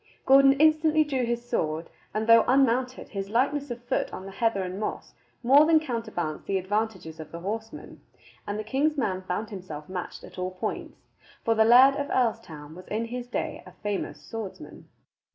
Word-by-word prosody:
Gordon 275 0 +7
instantly 310 +1 +4
drew 270 -4 -1
his 240 0 -3
sword, 160 -6 -1 0.2
and, 215 +1 -2
though 230 0 +7
unmounted, 255 -1 +2
his 195 -1 -5
lightness 280 +5 0
of 240 0 -6
foot - - -1
on 190 - -7
the 195 - -8
heather 200 -1 0
and 185 +1 -5
moss 215 - -5 0.3
more 280 +5 +6
than 325 -1 +6
counterbalanced 220 - -4
the 195 - +1
advantages 190 -4 -3
of 160 - -9
the 170 - -7
horseman, 220 +4 -6 0.5
and 205 0 -3
the 215 - -3
king's 285 +7 0
man 190 -8 -1
found 190 +4 -4
himself 170 -7 -8
matched 185 -1 -6
at - - -11
all 185 0 -3
points; 185 - -5 0.4
for 230 - +3
the 220 0 +4
Laird 255 +4 +7
of 285 - -2
Earlstoun 195 - -2
was 180 +2 -12
in 220 +2 -2
his 245 +1 -6
day - - -4
a - - -14
famous 205 -2 -3
swordsman. 225 -4 -9
225 Hz, 185 wpm, -27 LUFS, 190-260 Hz, 0.5 s, Gordon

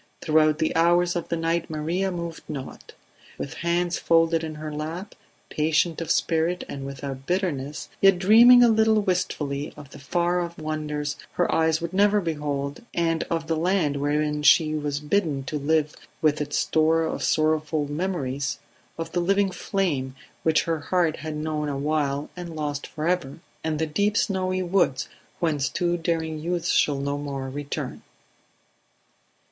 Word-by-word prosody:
Throughout 155 -1 +3
the 160 - 0
hours 175 +2 +3
of 170 - -3
the 170 - 0
night 165 +1 -1
Maria 165 +5 -1
moved 170 -2 -5
not; 135 -3 -7 0.4
with 140 - -5
hands 175 +1 0
folded 165 0 +3
in 155 -1 -5
her 155 0 -6
lap, 165 +7 -5 0.4
patient 155 +2 +1
of 165 - -5
spirit 165 +2 +1
and 135 -1 -6
without 135 -1 -7
bitterness, 155 -6 -2
yet 195 -2 +6
dreaming 235 +6 +8
a - - +7
little 220 -1 +3
wistfully 150 -7 -1
of 140 -2 -12
the - - -11
far 175 +5 0
off 170 0 -5
wonders 150 -1 -3 0.2
her 175 - +1
eyes 160 0 +2
would 170 +1 -4
never 205 +2 +4
behold 145 -4 -3
and 165 -1 +1
of 165 -1 -2
the 165 0 0
land 160 -3 +1
wherein 150 +1 0
she 155 +1 +5
was 145 -2 -2
bidden 150 -3 0
to 150 +3 -3
live 150 +1 +1 0.3
with 150 -1 +2
its 145 0 -2
store 160 +1 +2
of 160 - -3
sorrowful 155 -1 +1
memories; 145 -4 -2 0.4
of 165 0 -5
the 175 - 0
living 195 +2 +2
flame 165 -8 -2 0.3
which 160 -1 +3
her 165 -1 -1
heart 165 +1 +1
had 155 -1 -5
known 150 -1 -2
awhile 145 0 -1
and 175 -2 -7
lost 145 -2 -3
forever, 160 -2 -2 0.2
and 160 -1 -1
the 160 - 0
deep 200 +8 0
snowy 185 -2 0
woods 175 -7 +1 0.3
whence 150 -5 0
too 175 -1 0
daring 165 -2 -2
youths 175 +2 -2
shall 145 -2 +3
no 140 +1 -2
more 135 -2 -4
return. 145 +1 -5
160 Hz, 160 wpm, -25 LUFS, 150-175 Hz, 0.4 s, dreaming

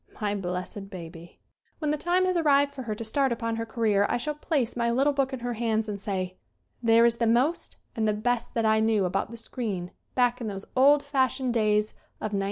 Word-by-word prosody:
My 205 -1 0
blessed 190 +1 -4
baby! 170 -3 -10 0.4
When 300 -2 -1
the - - +2
time 350 +4 +1
has 370 0 +1
arrived 285 -4 +3
for 275 - -6
her 220 -4 -3
to 230 - -5
start 265 +4 +1
upon 230 -1 -2
her 230 0 -3
career 215 -3 +2
I - - +1
shall 300 +5 -2
place 290 -5 -1
my 235 -1 +1
little 270 +5 +2
book 275 -1 0
in 260 -2 -5
her 245 0 -2
hands 220 -1 0
and 200 -2 -4
say: 185 -2 -3 0.4
"There 230 0 +5
is 235 0 +2
the 230 0 +1
most 255 +9 +1 0.2
and 220 -1 0
the 210 - +2
best 235 +3 -1
that 230 -1 +1
I 220 0 +4
knew 220 -3 +2
about 185 +3 -1
the 235 - -9
screen 205 -6 -4 0.2
back 245 0 +2
in 230 - -3
those 195 -1 -5
old 280 +2 +5
fashioned 265 -2 0
days 210 -2 +2 0.2
of 215 - -5
1921." 200 - +1
230 Hz, 225 wpm, -27 LUFS, 210-260 Hz, 0.4 s, There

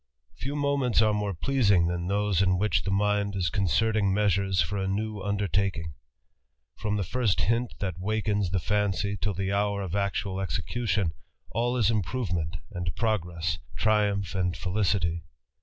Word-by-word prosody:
Few 140 +2 -4
moments 140 -5 +1
are 110 -1 +3
more 105 -2 -1
pleasing 100 -5 +3
t 85 - 0
han 90 0 -3
those 100 -1 +1
in 95 -1 +3
w]iirh 95 0 +1
mind 100 0 +1
is 90 -4 0
concerting 100 +2 +2
measures 95 -2 +2
for 100 - +1
a 95 - -1
new 105 +1 -2
undertaking..^ 100 -5 -1 0.8
Fi 105 0 -2
the 105 - 0
first 105 -1 +1
hint 115 +6 0
that 95 -3 -3
wakens 105 -1 0
the 95 - -1
fancy 100 +2 0
till 100 -1 -2
the 95 +2 -1
hour 100 0 0
of 90 -3 -5
ac 100 -1 0 0.2
execution, 95 -1 -1 0.4
all 120 +3 0
is 115 -3 +3
improvement 90 -6 -1 0.2
and 90 -3 -3
progress, 85 -7 -1 0.2
triumph 100 +3 +2
feHcity. 90 -2 0
100 Hz, 150 wpm, -27 LUFS, 90-105 Hz, 0.8 s, are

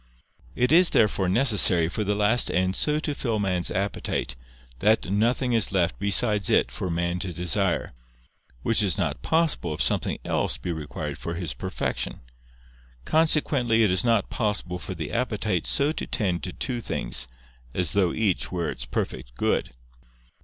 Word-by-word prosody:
It 125 +2 +1
is 175 +2 +6
therefore 100 -4 +2
necessary 100 -6 +4
for 105 +5 -2
the 105 0 0
last 105 +4 +2
end 95 +1 +1
so 150 0 +2
to 155 -1 -2
fill 120 -6 -1
man's 90 -4 0
appetite, 95 -10 -2 0.4
that 105 -2 +2
nothing 120 +4 +1
is 115 -5 +3
left 90 -3 0
besides 100 0 +1
it - - +3
for 95 - -4
man 85 +1 -1
to 95 0 -3
desire. 90 +2 0 0.7
Which 115 -1 +2
is 95 -7 +1
not - - -2
possible, 160 - +1
if - - -3
something - - 0
else - - 0
be 65 +8 -4
required 75 -2 -5
for 85 - -4
his 85 -6 -3
perfection. - - -3 0.8
Consequently 145 -7 +2
it 105 - +3
is 95 - +2
not 115 -3 +1
possible 105 -5 -2
for 95 - -6
the 80 -3 -5
appetite 110 -7 -1
so 140 +2 +2
to - - -5
tend 95 -6 -1
to 90 - -4
two 120 +5 -3
things, 105 - -2 0.5
as 90 -3 +1
though 95 -4 +2
each 105 -5 0
were 85 -2 -1
its - - -6
perfect - - -4
good. - - 0
100 Hz, 165 wpm, -25 LUFS, 90-115 Hz, 0.8 s, is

